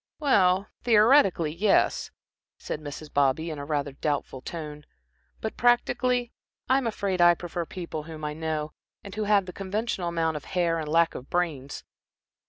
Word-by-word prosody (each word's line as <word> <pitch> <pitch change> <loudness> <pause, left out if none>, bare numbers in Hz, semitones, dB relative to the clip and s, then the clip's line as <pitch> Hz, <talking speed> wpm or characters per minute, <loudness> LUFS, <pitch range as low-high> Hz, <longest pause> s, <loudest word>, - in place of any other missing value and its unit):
"Well, 195 -10 +3 0.2
theoretically, 215 - +4
yes," 200 +4 +2 0.5
said 155 - -5
Mrs. 150 0 -8
Bobby, 145 +4 +2
in 150 - -6
rather 145 -1 -2
a - - -18
doubtful 140 -2 -3
tone, 150 -1 -7 0.6
"but, 220 - -4
practically, 245 0 +2 0.4
I'm 265 -1 +2
afraid 195 -4 -1
I 175 0 +7
prefer 170 -1 -5
people 170 -4 -5
whom 155 0 -8
I 150 - -2
know, 155 -1 -3 0.3
and 200 - -9
who 215 +1 -2
have 205 -2 +3
the 180 - -8
conventional 195 -1 -2
amount 165 -2 0
of 145 - -9
hair 170 -3 0
and 155 - -4
lack 165 +1 +3
of 130 - -9
brains. 155 -6 -2
170 Hz, 160 wpm, -27 LUFS, 150-200 Hz, 0.6 s, I